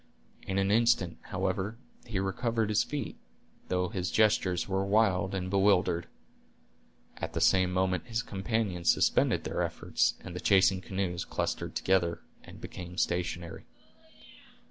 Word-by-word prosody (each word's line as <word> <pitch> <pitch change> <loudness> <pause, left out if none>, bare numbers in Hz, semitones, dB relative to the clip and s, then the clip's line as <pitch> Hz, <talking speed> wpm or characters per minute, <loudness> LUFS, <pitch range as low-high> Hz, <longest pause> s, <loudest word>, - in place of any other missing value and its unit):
In 95 - -1
an 95 0 +2
instant, 110 -6 +2
however, 95 +3 -2 0.3
he 110 -4 -3
recovered 110 +3 -1
his 105 - +3
feet, 145 -1 -5 0.5
though 90 -1 0
his 90 -1 -2
gestures 105 -5 +2
were 95 0 0
wild 100 -2 +2
and 95 -1 -2
bewildered. 95 -3 +2 1.1
At - - -5
the - - -1
same 95 -1 +4
moment 95 +2 0
his 115 0 -2
companions 95 -5 0
suspended - - +2
their - - -2
efforts, - - 0
and 90 - -8
the - - -3
chasing 95 -1 +4
canoes 95 -2 -3
clustered - - -3
together, 85 -3 +1 0.2
and - - -12
became 90 0 -8
stationary. 85 -2 -2
95 Hz, 135 wpm, -30 LUFS, 90-105 Hz, 1.1 s, same